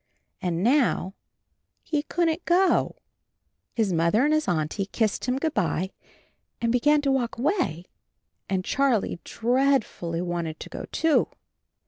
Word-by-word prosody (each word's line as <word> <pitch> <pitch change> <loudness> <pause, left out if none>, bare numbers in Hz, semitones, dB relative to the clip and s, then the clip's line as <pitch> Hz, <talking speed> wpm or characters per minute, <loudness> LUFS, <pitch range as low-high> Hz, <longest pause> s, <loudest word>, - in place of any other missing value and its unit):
And 175 -1 -1
now 240 -6 +2 0.7
he 300 -2 -1
couldn't 330 +1 -1
go! 365 +2 +3 0.8
His 215 -5 +1
Mother 170 - +3
and 300 - +3
his 310 0 +1
Auntie 175 +3 -1
kissed 215 0 -1
him 250 +1 0
good 315 +2 -1
by 190 - 0 0.7
and 230 -1 0
began 290 +5 +3
to 275 - +2
walk 250 -3 -1
away, 240 - 0 0.6
and 185 -1 -1
Charlie 255 -10 +1
dreadfully 240 -9 0
wanted 170 -3 -3
to - - -8
go, - - -6
too. 320 -2 +2
235 Hz, 130 wpm, -25 LUFS, 180-290 Hz, 0.8 s, go